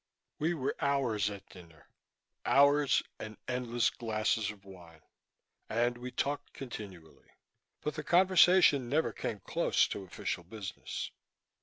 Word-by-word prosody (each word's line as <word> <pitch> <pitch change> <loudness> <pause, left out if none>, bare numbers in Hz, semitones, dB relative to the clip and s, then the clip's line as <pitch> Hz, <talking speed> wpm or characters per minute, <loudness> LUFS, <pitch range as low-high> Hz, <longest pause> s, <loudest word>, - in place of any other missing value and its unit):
We 165 +3 +1
were 135 -3 -2
hours 125 -8 +1
at 100 -1 -9
dinner, 80 -6 -16 0.6
hours 140 0 +4 0.2
and 110 -1 -7
endless 120 -1 0
glasses 110 -2 -1
of 100 -2 -10
wine, 85 -4 -14 0.7
and 120 +2 +1
we 125 +1 -5
talked 140 +3 -3
continually. 100 -10 -10 0.5
But 150 - -2
the 155 - -5
conversation 175 -6 +5
never 155 +4 +1
came 105 -3 -4
close - - +2
to - - -5
official 90 0 -4
business. 100 +2 -6
120 Hz, 125 wpm, -32 LUFS, 100-140 Hz, 0.7 s, conversation